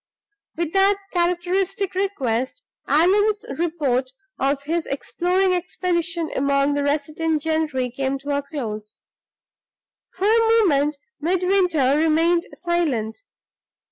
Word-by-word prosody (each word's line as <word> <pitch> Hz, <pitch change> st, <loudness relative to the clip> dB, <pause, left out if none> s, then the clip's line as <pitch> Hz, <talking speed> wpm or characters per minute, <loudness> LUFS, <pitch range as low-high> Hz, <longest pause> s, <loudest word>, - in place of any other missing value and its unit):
With 335 Hz, -1 st, -2 dB
that 390 Hz, +1 st, +4 dB, 0.2 s
characteristic 360 Hz, +2 st, 0 dB
request, 300 Hz, -, -2 dB, 0.2 s
Allan's 410 Hz, +7 st, +3 dB
report 290 Hz, -7 st, 0 dB, 0.3 s
of 275 Hz, +1 st, 0 dB
his 325 Hz, +3 st, -2 dB
exploring 365 Hz, +6 st, 0 dB
expedition 345 Hz, -2 st, -2 dB
among 280 Hz, +1 st, +2 dB
the 285 Hz, 0 st, 0 dB
resident 305 Hz, +2 st, -1 dB
gentry 310 Hz, -6 st, -1 dB
came 270 Hz, +2 st, -2 dB
to 285 Hz, +1 st, -3 dB
a 285 Hz, -, 0 dB
close. 220 Hz, -7 st, -6 dB, 1.1 s
For 375 Hz, -, -3 dB
a 445 Hz, +2 st, +5 dB, 0.3 s
moment 295 Hz, -2 st, +2 dB, 0.2 s
Midwinter 350 Hz, -5 st, +2 dB
remained 330 Hz, +2 st, +2 dB
silent. 320 Hz, -, -1 dB
320 Hz, 105 wpm, -22 LUFS, 280-360 Hz, 1.1 s, a